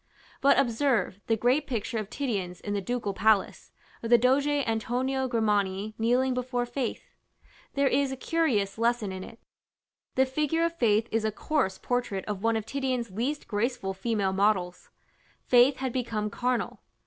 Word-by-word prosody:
But 280 - +5
observe 240 -5 +1
the 225 - +2
great 255 +6 +2
picture 225 -2 -2
of 215 -2 -5
Titian's 195 -10 -3
in 205 - -4
the 200 - -1
ducal 230 -1 -2
palace, 210 0 +1 0.3
of 230 - -4
the 240 - +8
Doge 260 +4 +3
Antonio 260 -1 0
Grimani 210 -3 0
kneeling 250 +3 +2
before 250 -1 -1
Faith: 245 0 -4 0.6
there 280 0 +3
is 275 0 +1
a 265 - -4
curious 250 - 0
lesson 230 -3 +1
in 185 0 -6
it. 230 - -11 0.8
The 265 - +4
figure 305 +5 0
of 335 - -1
Faith 220 -5 +2
is 225 0 +1
a 220 - 0
coarse 235 -4 -1
portrait 245 -6 -2
of 205 -2 -4
one 225 0 +2
of 220 - -4
Titian's 255 -4 -2
least 255 +9 -3
graceful 210 -2 -1
female 195 -1 -1
models: 190 -3 0 0.6
Faith 250 +2 +5
had 260 -2 -3
become 220 -4 -2
carnal. 245 +1 -2
235 Hz, 160 wpm, -28 LUFS, 210-260 Hz, 0.8 s, the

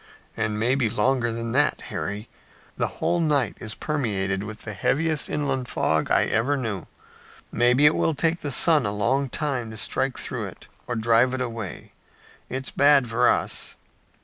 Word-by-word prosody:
"And 105 -1 -1
maybe 125 +1 +1
longer 120 +2 +1
than 115 0 -4
that, 145 +4 +2
Harry. 105 +3 -4 0.5
The - - 0
whole 175 - +1
night 145 -8 +1
is 110 -2 -6
permeated 100 -10 -2
with 105 +1 -8
the 110 - -6
heaviest 150 - 0
inland 135 -4 -1
fog 80 -8 0
I - - +3
ever 130 +6 +1
knew. 110 -9 -4 0.6
Maybe 125 +4 +3
it 150 - +6
will 160 - +1
take 165 +4 0
the 145 - -3
sun 150 -2 +5
a - - -1
long 130 +7 0
time 130 -5 -2
to 110 - -8
strike - - 0
through - - -3
it - - -11 0.2
or 120 - -2
drive 120 +3 +3
it 130 - -3
away. 115 -6 -5 0.6
It's 130 +1 -4
bad 140 -3 +4
for 120 +2 +3
us." - - -1
125 Hz, 170 wpm, -24 LUFS, 110-140 Hz, 0.6 s, it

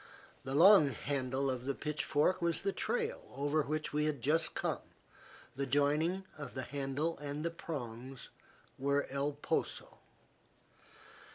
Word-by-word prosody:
The 135 +1 -3
long 170 -2 +8
handle 135 +1 -1
of 125 -1 -4
the 140 0 -1
pitchfork 150 +4 +1
was 170 -1 +1
the 195 - +1
trail - - -1
over 145 +2 +1
which 155 +1 -2
we 150 0 +2
had 150 -3 0
just 160 +5 +2
come, - - -1 0.7
the 135 +1 -1
joining 150 +7 +2
of 140 -3 -7
the 130 - -2
handle 145 +4 -2
and 145 +1 -4
the 170 - 0
prongs 130 -6 -6 0.5
were 140 +1 +2
El 140 +2 0
Poso. 145 - -3
145 Hz, 135 wpm, -34 LUFS, 135-160 Hz, 0.7 s, long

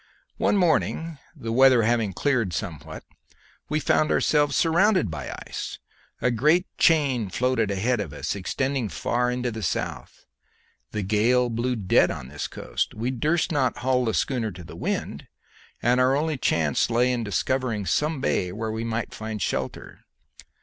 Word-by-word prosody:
"One - - +2
morning, 165 -3 +1 0.2
the 115 - -5
weather 130 -1 +6
having 115 -2 +1
cleared 115 -3 0
somewhat, 80 -2 -6 0.7
we 155 +1 +1
found 155 0 +2
ourselves 145 -1 +2
surrounded 175 - +3
by 70 -4 -5
ice. - - -6 0.5
A 125 - +3
great 150 +10 +3
chain 140 - +3
floated 125 0 0
ahead 110 +5 0
of 95 -8 -4
us, 75 - -3
extending 130 +5 -2
far 125 +4 0
into 125 0 -2
the 110 0 -6
south. - - -4 0.6
The 105 - -3
gale 120 +5 +2
blew 120 +2 -1
dead 100 -5 +3
on - - -5
to 65 - -12
this 75 0 -4
coast; - - -3
we 120 +4 -2
durst 155 +8 0
not 140 -5 +1
haul 125 0 +1
the 110 - 0
schooner 120 -5 0
to 90 0 -10
the - - -11
wind, - - -3 0.6
and 125 +2 +3
our 130 +1 +4
only 155 +2 0
chance 80 - +1
lay 120 +2 +2
in 120 -2 -2
discovering 115 0 -1
some 150 - 0
bay 90 -8 0
where 110 +3 -4
we 110 +1 -3
might 115 0 -3
find 110 -1 -5
shelter. - - -4
120 Hz, 165 wpm, -25 LUFS, 105-135 Hz, 0.7 s, weather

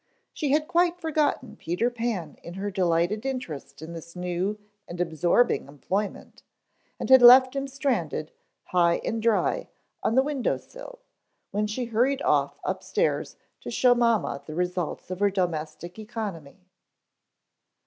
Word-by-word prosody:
She 295 - -2
had 305 +1 +2
quite 350 0 +2
forgotten 295 -8 -1
Peter 200 +9 -1
Pan 225 -10 -3
in 170 - -9
her 200 +1 -3
delighted 180 +2 +1
interest 165 - -5
in 165 +2 -7
this 170 +1 -10
new 180 +3 -2 0.3
and 175 - -8
absorbing 175 - +2
employment, 190 +8 -4 0.6
and - - -3
had 260 -1 +8
left 255 +2 +9
him 275 0 -2
stranded, 245 - -2 0.3
high 170 -1 +3
and 225 0 -2
dry, 230 -1 +1 0.3
on 225 - 0
the 265 - +5
window 280 -3 -1
sill, - - -12 0.5
when 210 +1 0
she 240 +4 -3
hurried 250 +5 +1
off - - +2
upstairs - - -1 0.2
to - - -8
show 250 -1 +4
to 240 - -2
mamma 230 -11 +1
the 155 - -8
results 180 0 -3
of 185 - -4
her 205 0 +4
domestic 175 -1 -3
economy. 195 -7 -7
210 Hz, 145 wpm, -26 LUFS, 175-255 Hz, 0.6 s, left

